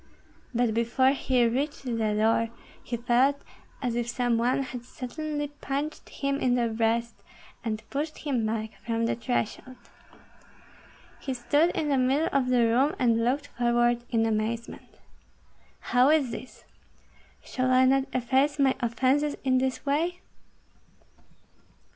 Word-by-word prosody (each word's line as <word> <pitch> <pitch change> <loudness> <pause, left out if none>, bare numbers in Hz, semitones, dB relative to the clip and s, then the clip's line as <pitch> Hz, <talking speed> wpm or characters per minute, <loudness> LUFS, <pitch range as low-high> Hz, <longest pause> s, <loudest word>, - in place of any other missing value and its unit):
But 240 -2 +1
before 235 +4 +2
he 260 -3 +1
reached 275 +6 -1
the 250 - -4 0.2
door 225 +1 +2 0.3
he 235 - -3
felt 250 +4 +2 0.4
as 245 -2 0
if 235 0 -2
some 240 -1 0
one 250 +3 +1
had 250 -2 -7
suddenly 290 +4 -5
punched 290 +1 -5
him 275 0 -2
in 250 -3 +2
the 240 -2 +1
breast 230 +1 0 0.5
and 215 -2 -4
pushed 300 +2 -3
him 265 -6 -1
back 220 -1 -3
from 230 0 -1
the - - +1
threshold. 245 +1 -3 1.4
He 265 - -4
stood 290 +7 +2
in 300 - -1
the 275 -2 +2
middle 270 +5 +2
of 275 -2 +1
the 245 -2 +4
room, 255 +6 +2
and 230 -2 +2
looked 275 +4 0
forward 240 0 +2
in 225 -2 +2
amazement. 225 +1 -3 1.0
"How 250 +2 +6
is 300 -6 +3
this? 255 - -9 0.8
Shall 255 0 -1
I 255 0 +5
not 270 +1 +3
efface 265 +4 +1
my 275 -2 +4
offences 260 +5 +1
in 260 -1 +3
this 260 +1 -2
way?" 330 +6 0
255 Hz, 140 wpm, -27 LUFS, 235-275 Hz, 1.4 s, How